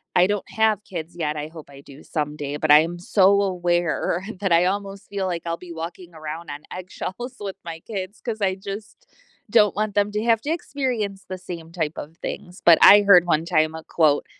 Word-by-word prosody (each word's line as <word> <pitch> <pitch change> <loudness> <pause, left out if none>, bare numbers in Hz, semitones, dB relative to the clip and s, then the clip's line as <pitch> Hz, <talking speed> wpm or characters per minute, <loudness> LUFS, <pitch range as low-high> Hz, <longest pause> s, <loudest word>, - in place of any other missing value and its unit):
I 180 +1 +5
don't 205 -1 -2
have 220 -2 +1
kids 175 -3 -7
yet- 155 -3 -2
I 150 0 -4
hope 160 -2 -12
I 140 -1 -13
do 140 0 -14
someday- 150 -1 -3
but 155 0 +1
I 150 - +10
am 170 +2 -2
so 195 +2 +4
aware, 175 -2 0 0.2
that 195 -3 0
I 170 +1 +5
almost 200 +1 -3
feel 200 -1 -3
like 170 -2 -3
I'll 170 - -1
be 180 0 -11
walking 170 +1 -7
around 160 +1 -7
on 145 +1 -6 0.2
eggshells 190 +7 -6
with 200 -2 -5
my 165 -1 -7
kids, 200 -1 -6
'cause 220 -3 -5
I 190 -2 +1
just 205 - -9 0.4
don't 210 -2 +4
want 215 -1 -1
them 205 0 +2
to 210 - -1
have 230 -2 +3
to 290 - -5
experience 245 - -2
the 185 - -4
same 170 -3 -8
type 160 -3 -3
of 160 +3 -8
things, 180 +1 -7
but 170 -2 +8
I 205 0 +9
heard, 190 -4 +7
one 165 -2 +1
time, 155 -2 +1
a 160 - -8
quote, 155 -4 +2
180 Hz, 215 wpm, -23 LUFS, 160-205 Hz, 0.4 s, I